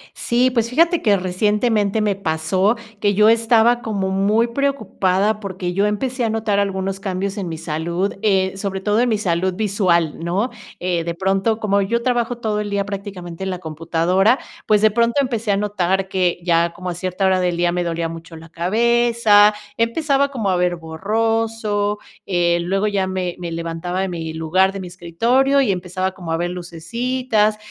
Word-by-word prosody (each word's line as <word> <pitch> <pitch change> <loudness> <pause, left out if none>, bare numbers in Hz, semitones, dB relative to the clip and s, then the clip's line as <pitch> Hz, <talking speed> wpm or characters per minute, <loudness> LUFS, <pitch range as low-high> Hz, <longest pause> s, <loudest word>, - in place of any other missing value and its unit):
Sí, 245 +2 +1
pues 230 -2 0
fíjate 335 +6 +3
que 205 -3 +3
recientemente 210 +3 +1
me 205 -2 +1
pasó 185 +5 0 0.2
que 205 -1 +2
yo 215 +2 +5
estaba 230 +1 +4
como 200 -4 -2
muy 205 +4 +2
preocupada 215 -6 0
porque 185 -3 -4
yo 200 +3 +1
empecé 250 +5 -2
a - - +1
notar 220 -2 0
algunos 195 -1 -1
cambios 195 +1 -3
en 190 -3 -3
mi 160 - -4
salud, 170 +5 -2
eh, 190 -3 +2
sobre 195 -1 -3
todo 210 +2 +2
en 245 - +2
mi 220 - +2
salud 185 -2 0
visual, 185 -6 +1
¿no? 190 +9 -1 0.3
Eh, 175 -2 0
de 170 0 -3
pronto, 195 +4 0
como 200 -2 +1
yo 235 +4 0
trabajo 240 -1 0
todo 215 -3 -1
el 210 - -3
día 200 -1 -1
prácticamente 190 -3 -7
en 190 - -2
la 180 - -4
computadora, 170 - +1 0.3
pues 210 -1 +3
de 215 - +6
pronto 235 +2 +1
empecé 230 -5 -2
a 200 - +3
notar 195 -2 0
que 180 -2 0
ya 170 -1 +2
como 180 0 -5
a - - -4
cierta 185 +2 -3
hora 190 -1 +3
del 175 -1 0
día 175 0 +1
me 180 0 -1
dolía 170 -1 -2
mucho 165 0 -10
la 165 +1 -13
cabeza, 220 +3 +3 0.2
empezaba 275 +4 +1
como 225 -8 -1
a 185 - +2
ver 180 0 +1
borroso, 210 +4 -1 0.3
eh, 175 -2 +2
luego 195 +4 0
ya 195 -2 0
me 185 -2 -3
me 175 -1 -5
levantaba 170 +2 -4
de 190 - -1
mi 165 -2 -5
lugar, 185 +4 +2
de 195 - -6
mi 180 - -7
escritorio 230 +11 +1
y 220 - +1
empezaba 185 +1 -3
como 175 -4 -6
a 165 - +1
ver 175 +1 -2
lucecitas 215 +6 -1
195 Hz, 185 wpm, -20 LUFS, 180-220 Hz, 0.3 s, de